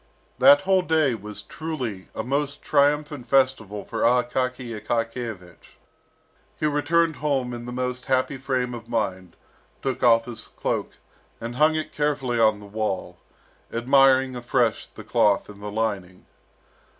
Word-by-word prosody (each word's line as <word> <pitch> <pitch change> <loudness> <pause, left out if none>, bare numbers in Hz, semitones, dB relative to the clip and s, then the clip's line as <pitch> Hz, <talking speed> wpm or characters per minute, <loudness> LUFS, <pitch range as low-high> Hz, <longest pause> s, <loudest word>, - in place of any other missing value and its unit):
That 285 +1 +8
whole 190 0 +3
day 155 -5 +2
was 105 -1 -7
truly 130 -12 -5
a 110 - -3
most 140 +3 -2
triumphant 145 -2 +1
festival 130 -7 +1
for - - -4
Akaky 125 0 +1
Akakiyevich. 115 -5 -5 0.8
He - - 0
returned 155 +2 +2
home 135 -4 -1
in 120 0 -7
the - - -5
most 125 0 -3
happy 130 +1 0
frame 130 -1 -2
of 115 -1 -9
mind, 95 -6 -2 0.5
took 135 -2 -2
off 115 -1 +5
his 120 -2 -8
cloak, - - -2 0.5
and 120 +1 -6
hung 155 +2 +4
it 155 - -3
carefully 145 -5 0
on 110 -2 +4
the 105 - -12
wall, 105 -1 -3 0.5
admiring 130 +1 +4
afresh 120 -2 0
the - - -12
cloth 105 0 +2
and 100 -1 -12
the 105 - -5
lining. 100 -4 -3
125 Hz, 140 wpm, -24 LUFS, 110-140 Hz, 0.8 s, That